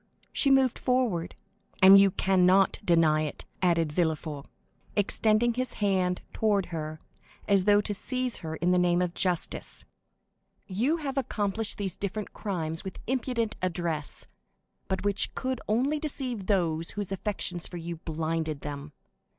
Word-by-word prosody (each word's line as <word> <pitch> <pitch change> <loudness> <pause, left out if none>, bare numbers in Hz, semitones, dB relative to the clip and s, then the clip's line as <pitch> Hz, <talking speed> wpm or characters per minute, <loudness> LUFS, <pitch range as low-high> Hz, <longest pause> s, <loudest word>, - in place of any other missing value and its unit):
She 280 - +2
moved 270 -2 +4
forward. 245 -10 0 0.4
"And 195 +1 +9
you 195 0 +6
cannot 190 0 +3
deny 165 -4 +4
it!" 150 -2 -5 0.2
added 165 -4 +2
Villefort, 155 -3 -1 0.5
extending 215 +3 +2
his 255 +1 -3
hand 185 -3 0
toward 205 -3 +1
her, 155 -1 -4 0.5
as 200 -3 +3
though 205 0 +5
to 205 - -3
seize 255 +3 -1
her 160 -2 -5
in 175 +2 +1
the 180 - +4
name 175 0 +3
of 175 -1 -2
justice. 180 -3 0 0.8
"You 240 - 0
have 275 -4 -2
accomplished 215 -3 -1
these 195 -4 -1
different 205 +1 -4
crimes 165 -6 -3
with 190 - -7
impudent 245 -3 -1
address, 170 -4 -2 0.6
but 190 0 -2
which 200 -1 +1
could 260 -1 -2
only 265 +8 +1
deceive 255 -9 -4
those 165 -5 +1
whose 205 -2 -3
affections 190 -3 -2
for 175 - -7
you 170 0 -5
blinded 160 -1 -3
them. 145 0 -7
190 Hz, 140 wpm, -28 LUFS, 165-220 Hz, 0.8 s, And